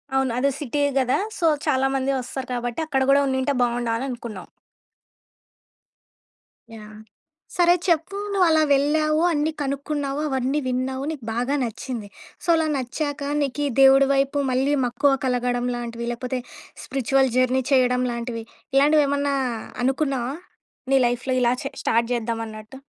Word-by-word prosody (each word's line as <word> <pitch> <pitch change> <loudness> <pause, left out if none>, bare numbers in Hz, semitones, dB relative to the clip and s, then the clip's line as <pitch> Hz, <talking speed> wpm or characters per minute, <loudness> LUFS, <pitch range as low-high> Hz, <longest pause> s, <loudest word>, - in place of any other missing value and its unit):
అవును. 265 -2 +2
అది 275 +3 +2
సిటీ 290 0 -2 0.2
కదా! 255 0 +2 0.2
సో, 335 - -1 0.2
చాలామంది 270 0 +1
వస్తారు 255 +1 -6
కాబట్టి, 245 +1 -3
అక్కడ 270 -3 0
కూడా 280 +1 +5
ఉండింటే 265 +1 0
బాగుండనని 235 0 -1
అనుకున్నావు. 235 -6 -7 2.3
యాహ్! 215 -1 -11 0.6
సరే 350 -1 +5
చెప్పు. 340 +3 +1 0.2
నువ్వు 380 -3 +3
అలా 315 -1 +4
వెళ్ళావు, 305 +2 +2
అన్ని 300 +1 0
కనుక్కున్నావు, 280 0 -2
అవన్నీ 265 +2 0
విన్నావు, 260 +1 -2
నీకు 295 -6 -8
బాగా 250 +5 0
నచ్చింది. 230 -1 -5 0.4
సో, - - -9
అలా 320 -1 +1
నచ్చాక 285 +3 -3 0.2
నీకీ 285 +1 -1 0.2
దేవుడి 270 0 +7
వైపు 275 +1 +1
మళ్ళీ 265 +3 +1
మక్కువ 245 +4 +2
కలగడం 245 -1 0
లాంటివి? 235 -1 -5
లేకపోతే 250 +1 -3 0.4
స్పిరిచువల్ 270 0 +1
జర్నీ 255 +1 +3
చేయడం 250 -1 +3
లాంటివి, 235 -1 -4 0.3
ఇలాంటివి 295 +2 +5
ఏమన్నా 285 0 0 0.5
అనుకున్నావా? 270 -1 0 0.6
నీ 270 - +6
లైఫ్‌లో 245 +2 -1
ఇలా 240 0 +3
చే 275 - -4
స్టార్ట్ 230 +1 +1
చేద్దాం 230 -1 -2
అన్నట్టు. 215 +3 -10
265 Hz, 135 wpm, -23 LUFS, 245-285 Hz, 2.3 s, దేవుడి